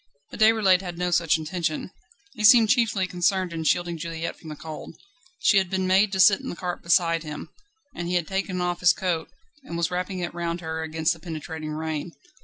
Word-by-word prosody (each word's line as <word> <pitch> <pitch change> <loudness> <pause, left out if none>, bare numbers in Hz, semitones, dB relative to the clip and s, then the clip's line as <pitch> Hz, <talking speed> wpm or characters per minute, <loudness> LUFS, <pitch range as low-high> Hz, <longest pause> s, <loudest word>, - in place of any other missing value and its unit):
But - - -9
Déroulède 215 -4 +5
had 175 -3 -7
no 180 0 -1
such 165 -2 +3
intention: 160 +1 -3 0.4
he 215 - -6
seemed 225 -1 +7
chiefly 225 -6 +2
concerned 180 0 0
in 165 -1 -4
shielding 175 0 +1
Juliette 165 0 -4
from 160 - -12
the 150 - -6
cold; 155 +1 -9 0.4
she 210 - +4
had 190 -2 -2
been 190 0 -1
made 195 +2 +3
to 190 - -1
sit 190 +1 +6
in - - -6
the - - -5
cart 180 0 -4
beside 170 -1 +2
him, 150 -2 -7 0.5
and 175 - -4
he 180 - -1
had 175 -2 +1
taken 190 -1 -2
off 175 0 -1
his 180 0 +5
coat, 170 -4 -2 0.3
and 170 - -6
was 170 0 0
wrapping 180 +1 -3
it 175 -1 -4
round 170 0 -3
her 160 -1 -4
against 160 +1 0
the 165 - -13
penetrating 160 -1 -6
rain. 155 +1 -4
175 Hz, 210 wpm, -25 LUFS, 160-185 Hz, 0.5 s, seemed